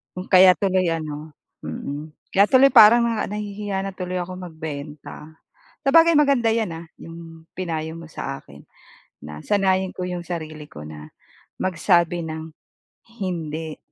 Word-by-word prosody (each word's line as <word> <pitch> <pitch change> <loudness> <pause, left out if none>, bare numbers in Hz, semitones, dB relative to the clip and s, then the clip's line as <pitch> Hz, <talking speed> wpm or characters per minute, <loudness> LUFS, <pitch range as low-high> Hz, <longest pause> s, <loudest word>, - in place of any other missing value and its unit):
Hmm 185 +1 -6
kaya 185 -1 +8
tuloy 185 +1 +1
ano 155 -1 -6 0.3
mm, 150 +2 -6 0.2
kaya 200 +1 +5
tuloy 270 +3 +6
parang, 230 +3 +8
ah, 215 - -1
nahihiya 205 -1 -4
na 195 - -4
tuloy 180 -1 -3
akong 180 +1 -6
magbenta. 155 -1 -8 0.5
Sabagay, 330 +4 +5
maganda 275 -6 +3
'yan 220 -5 0
ah, 165 +1 -9
'yong 165 -1 -12
pinayo 160 -3 -4
mo 165 -1 -10
sa 135 0 -5
akin, 70 0 -16 0.6
na 75 0 -8
sanayin 190 -2 +1
ko 180 - -4
'yong 180 -1 -4
sarili 155 -3 -6
ko 75 - -11
na 75 0 -10 0.5
magsabi 175 -2 +1
ng 160 0 -7 0.7
"Hindi, 160 -4 -4
175 Hz, 140 wpm, -22 LUFS, 155-195 Hz, 0.7 s, kaya